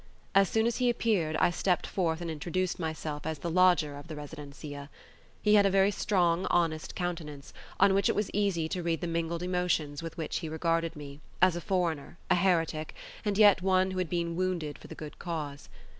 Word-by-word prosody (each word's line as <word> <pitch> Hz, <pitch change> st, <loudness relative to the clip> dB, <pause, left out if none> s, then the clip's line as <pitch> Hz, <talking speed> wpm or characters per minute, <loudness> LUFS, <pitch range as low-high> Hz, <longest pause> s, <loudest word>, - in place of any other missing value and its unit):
As 195 Hz, -1 st, +5 dB
soon 220 Hz, 0 st, +2 dB
as 235 Hz, 0 st, 0 dB
he 250 Hz, -1 st, +2 dB
appeared 205 Hz, -10 st, +1 dB
I 175 Hz, -, +3 dB
stepped 180 Hz, +1 st, 0 dB
forth 170 Hz, -3 st, -1 dB
and 170 Hz, -1 st, -3 dB
introduced 175 Hz, +5 st, -2 dB
myself 160 Hz, -2 st, -4 dB
as 160 Hz, -1 st, -2 dB
the 170 Hz, +4 st, -4 dB
lodger 175 Hz, -5 st, +4 dB
of 145 Hz, -, -11 dB
the 160 Hz, -, -7 dB
residencia. 145 Hz, -1 st, -8 dB, 0.5 s
He 210 Hz, -, +4 dB
had 205 Hz, -1 st, +6 dB
a -, -, +3 dB
very 195 Hz, +1 st, +4 dB
strong, 180 Hz, -3 st, +1 dB
honest 165 Hz, -3 st, 0 dB
countenance, 165 Hz, -6 st, -5 dB, 0.3 s
on 195 Hz, 0 st, +6 dB
which 195 Hz, -1 st, +3 dB
it -, -, +1 dB
was 210 Hz, -1 st, -1 dB
easy 195 Hz, -6 st, +1 dB
to 180 Hz, -, -2 dB
read 165 Hz, -2 st, -1 dB
the -, -, -2 dB
mingled 170 Hz, +1 st, -2 dB
emotions 180 Hz, -5 st, -1 dB
with 165 Hz, 0 st, -7 dB
which 160 Hz, -, -2 dB
he 160 Hz, -, -5 dB
regarded 165 Hz, +1 st, 0 dB
me, 145 Hz, -1 st, -9 dB, 0.2 s
as 185 Hz, -2 st, +5 dB
a 175 Hz, -, -3 dB
foreigner, 175 Hz, -4 st, -1 dB
a -, -, +6 dB
heretic, 165 Hz, -4 st, +1 dB, 0.3 s
and 205 Hz, -2 st, -1 dB
yet 205 Hz, -3 st, +6 dB
one 190 Hz, 0 st, +2 dB
who 185 Hz, -, -3 dB
had 180 Hz, -3 st, -1 dB
been 170 Hz, -1 st, -1 dB
wounded 175 Hz, -5 st, -2 dB
for -, -, -12 dB
the -, -, -9 dB
good 155 Hz, -1 st, -9 dB
cause. 150 Hz, -4 st, -5 dB
170 Hz, 205 wpm, -30 LUFS, 155-185 Hz, 0.5 s, had